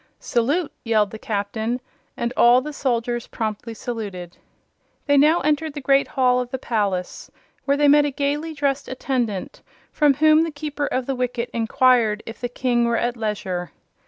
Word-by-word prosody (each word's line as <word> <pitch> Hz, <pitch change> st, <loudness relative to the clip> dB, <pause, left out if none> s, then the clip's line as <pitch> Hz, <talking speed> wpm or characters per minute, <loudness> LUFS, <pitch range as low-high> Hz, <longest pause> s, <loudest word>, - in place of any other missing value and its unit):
"Salute!" 285 Hz, +8 st, 0 dB
yelled 215 Hz, -3 st, +2 dB
the 220 Hz, -, -8 dB
Captain, 220 Hz, +1 st, -2 dB, 0.4 s
and 235 Hz, 0 st, -2 dB
all 240 Hz, +1 st, +6 dB
the 300 Hz, +3 st, -6 dB
soldiers 240 Hz, -3 st, -1 dB
promptly 225 Hz, 0 st, -4 dB
saluted. 200 Hz, -7 st, -6 dB, 0.7 s
They 285 Hz, -, +3 dB
now 305 Hz, +5 st, +5 dB
entered 305 Hz, +1 st, 0 dB
the -, -, -3 dB
great 275 Hz, 0 st, +3 dB
hall 250 Hz, -2 st, +2 dB
of 250 Hz, -1 st, -3 dB
the 260 Hz, -, -3 dB
palace, 200 Hz, -7 st, -2 dB, 0.4 s
where 280 Hz, 0 st, +2 dB
they 295 Hz, 0 st, +4 dB
met 290 Hz, +1 st, +6 dB
a -, -, +1 dB
gaily 290 Hz, +3 st, -2 dB
dressed 280 Hz, -1 st, -1 dB
attendant, 245 Hz, -7 st, -3 dB, 0.3 s
from 295 Hz, -2 st, +3 dB
whom 310 Hz, +2 st, +5 dB
the 330 Hz, -, 0 dB
Keeper 295 Hz, -1 st, -4 dB
of 255 Hz, -1 st, -2 dB
the 270 Hz, -, -1 dB
Wicket 245 Hz, -1 st, -3 dB
inquired 230 Hz, -2 st, +2 dB
if 225 Hz, -, -9 dB
the 245 Hz, -, -2 dB
King 240 Hz, -1 st, +1 dB
were 235 Hz, 0 st, +1 dB
at 240 Hz, 0 st, -1 dB
leisure. 190 Hz, -7 st, -3 dB
250 Hz, 170 wpm, -22 LUFS, 225-285 Hz, 0.7 s, all